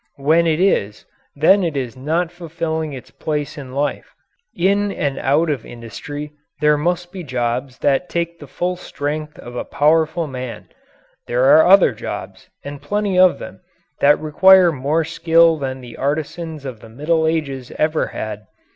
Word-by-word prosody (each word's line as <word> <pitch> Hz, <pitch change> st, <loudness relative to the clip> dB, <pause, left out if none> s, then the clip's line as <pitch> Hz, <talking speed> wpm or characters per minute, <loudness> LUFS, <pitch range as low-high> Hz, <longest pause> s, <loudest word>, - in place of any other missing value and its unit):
When 160 Hz, +4 st, +3 dB
it 160 Hz, 0 st, +1 dB
is, 105 Hz, -, +1 dB, 0.3 s
then 185 Hz, +7 st, +4 dB
it 160 Hz, -4 st, -2 dB
is 125 Hz, -4 st, -3 dB
not 160 Hz, +6 st, -1 dB
fulfilling 165 Hz, -2 st, -4 dB
its 130 Hz, -3 st, -10 dB
place 150 Hz, -2 st, -3 dB
in 135 Hz, -4 st, -9 dB
life. 140 Hz, +2 st, -3 dB, 0.4 s
In 200 Hz, +3 st, +2 dB
and 140 Hz, -7 st, -2 dB
out 145 Hz, +6 st, +2 dB
of 140 Hz, -, -3 dB
industry 145 Hz, +6 st, -8 dB, 0.3 s
there 150 Hz, 0 st, +4 dB
must 175 Hz, +3 st, -1 dB
be 185 Hz, -, -7 dB
jobs 125 Hz, -1 st, -2 dB
that 145 Hz, +5 st, +2 dB
take 170 Hz, 0 st, -3 dB
the 145 Hz, -, -11 dB
full 180 Hz, +7 st, -2 dB
strength 150 Hz, -2 st, -5 dB
of 120 Hz, 0 st, -10 dB
a -, -, -3 dB
powerful 160 Hz, +2 st, +1 dB
man; 130 Hz, -4 st, -7 dB, 0.6 s
there 125 Hz, +1 st, +1 dB
are 155 Hz, +5 st, +7 dB
other 195 Hz, +1 st, +7 dB
jobs, -, -, -7 dB
and 145 Hz, 0 st, -8 dB
plenty 200 Hz, +4 st, 0 dB
of 185 Hz, -1 st, +6 dB
them, -, -, -10 dB, 0.4 s
that 145 Hz, +1 st, +5 dB
require 180 Hz, +4 st, +5 dB
more 150 Hz, +3 st, 0 dB
skill 165 Hz, 0 st, +3 dB
than 130 Hz, -1 st, -4 dB
the 120 Hz, -2 st, -11 dB
artisans 155 Hz, +2 st, -3 dB
of 125 Hz, -5 st, -6 dB
the 115 Hz, -, -14 dB
Middle 160 Hz, +7 st, 0 dB
Ages 140 Hz, -6 st, -2 dB
ever 155 Hz, +1 st, +1 dB
had. 105 Hz, -1 st, -6 dB
150 Hz, 165 wpm, -19 LUFS, 135-170 Hz, 0.6 s, are